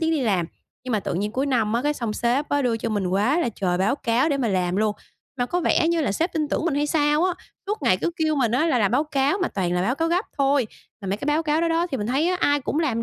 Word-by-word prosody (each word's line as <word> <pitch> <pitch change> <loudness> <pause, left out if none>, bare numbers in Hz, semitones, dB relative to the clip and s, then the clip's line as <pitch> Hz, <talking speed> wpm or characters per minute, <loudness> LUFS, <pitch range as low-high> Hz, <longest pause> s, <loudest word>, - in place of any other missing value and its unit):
tiếng 325 0 +1
đi 315 -3 +1
làm. 190 -8 +1 0.4
Nhưng 255 - -3
mà 215 - +1
tự 175 - -3
nhiên 205 +4 -2
cuối 270 +3 -1
năm 230 -6 +1
á, 235 +2 0
cái 295 0 0
xong 230 -6 -3
sếp 245 +7 0
á, 285 -1 +1
đưa 235 -2 +1
cho 225 - -3
mình 205 -4 -1
quá 210 - +1
là 245 - 0
trời 185 -4 -1
báo 195 +7 +2
cáo 245 +4 +1
để 285 - +1
mà 250 -5 0
làm 185 -1 0
luôn. 215 0 +1 0.4
Mà 245 - +1
có 355 +7 -1
vẻ 325 - +2
như 335 -1 +1
là 270 -10 0
sếp 330 - -1
tin 305 -3 -1
tưởng - - -1
mình 335 -5 0
hay 290 +1 +1
sao 295 +1 +2
á, 365 -2 +1 0.3
suốt 415 -6 -3
ngày 210 -8 +3
cứ 340 - -1
kêu 315 -1 +1
mình 235 -5 +1
á 305 +7 +2
là 260 -7 +2
làm 205 -2 +2
báo 280 +6 +2
cáo 285 +5 0
mà - - +1
toàn 180 -3 -2
là 180 0 +1
báo 240 +6 +1
cáo 325 +3 -1
gấp 355 +5 +1
thôi. 275 -3 +2 0.3
Mà 195 - -6
mấy 195 - 0
cái 280 - -6
báo 300 +2 +2
cáo 310 +1 +1
đó 335 - +1
đó 330 +1 +1
thì 265 - -1
mình 210 - -3
thấy 275 +7 +1
á, 365 - +1
ai 290 0 +2
cũng 285 - -2
làm 240 -8 0
270 Hz, 320 wpm, -23 LUFS, 215-310 Hz, 0.4 s, ngày